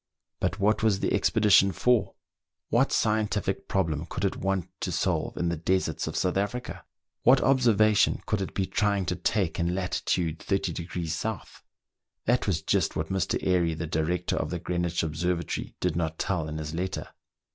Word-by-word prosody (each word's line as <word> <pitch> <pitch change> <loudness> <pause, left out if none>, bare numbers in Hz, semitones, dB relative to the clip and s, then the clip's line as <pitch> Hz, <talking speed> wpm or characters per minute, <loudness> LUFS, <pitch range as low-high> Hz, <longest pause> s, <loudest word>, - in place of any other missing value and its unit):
But - - -1
what 105 +2 +2
was 110 -3 +2
the - - 0
expedition 100 -2 +4
for.? 120 0 +1 0.5
What 125 +5 +3
scientific 105 -3 0
problem 80 -5 -1
could 95 - -3
it 95 - 0
want 95 -2 -1
to 90 - -2
solve 90 -1 -1
in 85 - 0
the 85 - -1
deserts 90 +4 -1
of - - -4
South 90 0 +1
Africa.? 105 +6 -3 0.4
What 130 +2 +6
observation 110 -5 +4
could 105 -3 -1
it 95 - -5
be 95 - +1
trying 100 -1 0
to 90 - -1
take 95 -2 0
in 85 +1 0
lat. 90 -1 -2
30° 85 0 -1 0.4
S.."* - - -18 0.6
That 120 0 +2
was 80 -5 0
just - - +1
what 80 0 -2
Mr. 95 -3 0
Airy, 85 -3 +2
the 80 - -4
director 80 +2 -1
of - - -1
the 90 - -2
Greenwich 85 0 -1
Observatory, 85 +2 -2
did 90 -3 0
not 80 -1 -1
tell 85 -5 -1
in 75 - -4
his 75 0 -5
letter. 90 +3 -3
90 Hz, 170 wpm, -27 LUFS, 85-100 Hz, 0.6 s, What